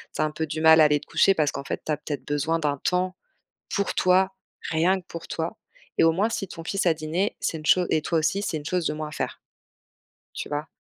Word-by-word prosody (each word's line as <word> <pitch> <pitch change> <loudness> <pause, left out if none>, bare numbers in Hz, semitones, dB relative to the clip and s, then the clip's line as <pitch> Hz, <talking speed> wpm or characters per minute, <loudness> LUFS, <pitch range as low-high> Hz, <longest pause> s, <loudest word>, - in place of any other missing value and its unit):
tu - - -1
as - - +3
un - - -1
peu 160 +1 -2
du 155 +1 -4
mal 160 0 +7
à - - +8
aller 150 -1 +4
te - - -16
coucher, 170 +4 +4
parce 155 -5 +1
qu'en 140 - -5
fait - - -4
tu - - -3
as 150 - +1
peut-être 145 -1 -5
besoin 160 +3 0
d'un 145 -3 0
temps, 185 +4 0 0.6
pour 200 - 0
toi, 190 +1 +3 0.4
rien 175 +4 +2
que 180 - -25
pour 170 -1 -8
toi. 165 +1 -3 0.4
Et - - +4
au 165 - +6
moins 195 +7 +1
si 195 -4 -3
ton 165 -1 -9
fils 195 +1 -1
a 165 - +5
dîné, 160 +6 -2
c'est 160 - -2
une 155 - -9
cho 180 - +5
et 155 -1 +1
toi 165 +1 0
aussi 195 +6 +1
c'est 165 - -2
une 145 - -6
chose 175 0 0
de 150 - 0
moins 155 0 -4
à - - -14
faire. - - -4 0.9
Tu - - -6
vois? 150 +1 -3
160 Hz, 265 wpm, -25 LUFS, 155-180 Hz, 0.9 s, à